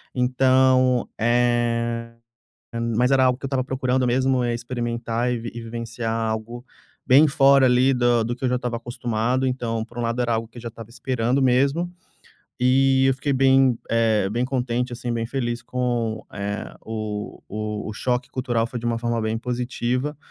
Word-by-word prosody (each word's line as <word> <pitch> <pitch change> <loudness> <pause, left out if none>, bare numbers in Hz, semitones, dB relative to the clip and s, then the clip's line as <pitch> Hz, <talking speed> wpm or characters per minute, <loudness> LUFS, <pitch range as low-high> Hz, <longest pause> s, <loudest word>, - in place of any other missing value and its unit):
então, 130 0 +3
eh, 120 0 +1 0.8
mas 125 +3 +2
era 130 -1 +4
algo 125 -1 +2
que - - -25
eu - - -1
estava 130 -1 0
procurando 130 -1 0
mesmo, 130 +1 +2
é 120 -1 0
experimentar 120 0 -2
e - - 0 0.2
e 120 - -6
vivenciar 115 0 -4
algo 115 +2 -3 0.4
bem 140 +5 +6
fora 135 -1 +5
ali 130 +2 +4
do 120 -2 +2
do 120 - -2
que 130 - -4
eu 125 - +2
já 125 - +1
estava 125 -1 -2
acostumado. 120 +2 -1
Então, 120 -3 -2
por 120 +1 -14
um - - -2
lado, 115 +1 -1
era 120 -1 0
algo 115 0 -2
que 115 - -17
eu 120 - -8
já 115 - -5
estava 115 -1 -11
esperando 125 +2 -1
mesmo, 140 +7 +2 0.7
e 135 +1 +4
eu 135 - +3
fiquei 140 +2 -2
bem, 135 -2 +4
eh, 110 -4 +2
bem 120 +4 -1
contente, 125 -1 -1
assim, 120 0 -4
bem 115 -1 -1
feliz 120 -2 -3
com, 120 -3 -2
eh, 100 +1 -5
o 110 -2 -5 0.5
o 110 - -4
choque 125 +2 -1
cultural 120 -3 -1
foi 120 +1 -5
de 115 - -9
uma 115 -1 0
forma 120 0 -1
bem 110 +1 -1
positiva. 125 +3 -2
120 Hz, 175 wpm, -23 LUFS, 115-130 Hz, 0.8 s, bem